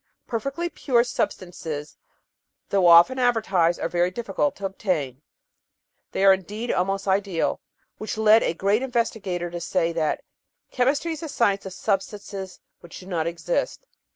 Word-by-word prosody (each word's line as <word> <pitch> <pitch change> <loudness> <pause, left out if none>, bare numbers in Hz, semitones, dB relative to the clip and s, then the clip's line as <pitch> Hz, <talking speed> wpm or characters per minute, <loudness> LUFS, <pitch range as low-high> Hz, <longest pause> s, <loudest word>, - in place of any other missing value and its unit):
Perfectly 275 +9 -3
pure 250 -8 +1
substances, 165 -10 -4 0.7
though 195 -3 +3
often 170 +10 +7
advertised, 200 -9 +2
are - - -1
very 175 0 +1
difficult 235 +7 -2
to 200 - -6
obtain; 160 - -2 0.9
they 195 - +1
are 195 - +9
indeed 210 +5 -4
almost 195 +2 -1
ideal, 195 -3 0 0.4
which 215 - -4
led 220 +1 +6
a 165 - 0
great 200 +6 +1
investigator 225 -9 -2
to 175 0 -5
say 165 0 0
that 160 -2 -1 0.5
"chemistry 280 +6 +1
is 315 - -7
the 320 - -6
science 200 -7 +1
of 190 - -7
substances 195 -1 -3 0.2
which 175 - -11
do 185 - -12
not 170 -4 -2
exist." - - -2
195 Hz, 145 wpm, -24 LUFS, 175-235 Hz, 0.9 s, are